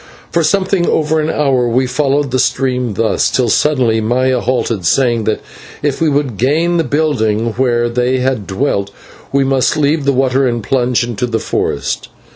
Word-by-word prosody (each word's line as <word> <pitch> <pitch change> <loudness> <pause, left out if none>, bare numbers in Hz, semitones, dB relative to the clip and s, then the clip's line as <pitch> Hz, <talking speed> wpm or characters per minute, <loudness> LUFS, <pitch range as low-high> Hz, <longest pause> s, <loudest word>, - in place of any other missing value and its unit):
For 170 - +1
something 190 +1 +1
over 155 0 +1
an 155 +1 -1
hour 135 -6 +1
we 130 +3 +1
followed 140 +1 0
the 130 - 0
stream 125 -4 0
thus, 115 +1 +1
till 125 -3 0
suddenly 120 -4 +2
Maya 125 +3 +1
halted, 120 -5 -1
saying 120 -2 +2
that 110 - -1 0.4
if 145 0 -1
we 160 - +3
would 140 -6 -1
gain 160 - +1
the 165 - +2
building 120 -7 0
where 120 -1 +1
they 125 +2 0
had 130 -5 -1
dwelt, 100 -2 -1 0.4
we 140 0 +2
must 135 0 +1
leave 150 0 +1
the 140 - +3
water 135 0 +1
and 120 -2 -2
plunge 125 -1 +1
into 120 0 -3
the 115 -2 -1
forest. - - -2
130 Hz, 175 wpm, -15 LUFS, 120-145 Hz, 0.4 s, we